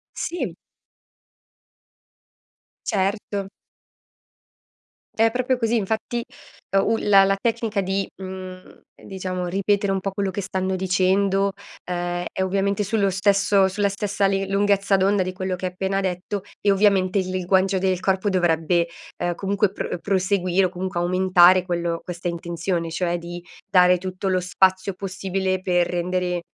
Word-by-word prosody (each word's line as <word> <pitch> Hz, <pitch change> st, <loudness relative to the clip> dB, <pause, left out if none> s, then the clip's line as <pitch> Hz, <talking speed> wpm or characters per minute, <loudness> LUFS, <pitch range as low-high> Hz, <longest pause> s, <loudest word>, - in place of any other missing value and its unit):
Si. 350 Hz, -, -3 dB, 2.3 s
Certo. 200 Hz, 0 st, -1 dB, 1.7 s
È 225 Hz, +1 st, +4 dB
proprio 255 Hz, +1 st, 0 dB
così, 230 Hz, -1 st, +1 dB
infatti, 220 Hz, +3 st, -2 dB, 0.6 s
u 225 Hz, +3 st, +2 dB
la 195 Hz, -1 st, +6 dB
la 195 Hz, 0 st, +2 dB
tecnica 225 Hz, -1 st, -1 dB
di, 195 Hz, +1 st, -1 dB, 0.2 s
mhmm, 185 Hz, -1 st, -9 dB, 0.2 s
diciamo 185 Hz, -2 st, -4 dB
ripetere 200 Hz, +2 st, +1 dB
un 190 Hz, -, -1 dB
po' 195 Hz, -, -2 dB
quello 195 Hz, 0 st, -2 dB
che 195 Hz, +2 st, -3 dB
stanno 190 Hz, 0 st, -2 dB
dicendo, 195 Hz, +1 st, +1 dB, 0.4 s
ehm, 175 Hz, 0 st, -2 dB
è 190 Hz, -, -1 dB
ovviamente 195 Hz, +2 st, 0 dB
sullo 200 Hz, 0 st, +1 dB
stesso 195 Hz, 0 st, +3 dB
sulla 200 Hz, +2 st, 0 dB
stessa 200 Hz, 0 st, -1 dB
li 195 Hz, 0 st, 0 dB
lunghezza 200 Hz, 0 st, +2 dB
d'onda 195 Hz, +1 st, +2 dB
di 185 Hz, -, -3 dB
quello 185 Hz, 0 st, -3 dB
che 185 Hz, +1 st, -3 dB
ha -, -, -2 dB
appena 190 Hz, +2 st, -2 dB
detto, 190 Hz, +2 st, -3 dB, 0.2 s
e 205 Hz, -, +1 dB
ovviamente 195 Hz, -1 st, +3 dB
il 185 Hz, -1 st, -2 dB
linguaggio 185 Hz, +1 st, +1 dB
del 185 Hz, -1 st, 0 dB
corpo 190 Hz, +1 st, 0 dB
dovrebbe, 170 Hz, -2 st, +1 dB, 0.3 s
uhm, 175 Hz, 0 st, 0 dB
comunque 200 Hz, +2 st, 0 dB
pro 200 Hz, -, -4 dB
proseguire, 190 Hz, -1 st, +1 dB
o -, -, 0 dB
comunque 185 Hz, 0 st, -4 dB
aumentare 185 Hz, 0 st, +5 dB
quello 170 Hz, -2 st, -2 dB
questa 175 Hz, 0 st, -5 dB
intenzione, 170 Hz, 0 st, -3 dB
cioè 175 Hz, +1 st, -1 dB
di 175 Hz, +1 st, -7 dB, 0.3 s
dare 180 Hz, -1 st, +5 dB
tutto 185 Hz, +2 st, -5 dB
lo 185 Hz, -1 st, +1 dB
spazio 190 Hz, +1 st, +2 dB
possibile 190 Hz, -1 st, -2 dB
per 180 Hz, -2 st, +2 dB
rendere, 180 Hz, 0 st, -1 dB
190 Hz, 140 wpm, -23 LUFS, 180-200 Hz, 2.3 s, la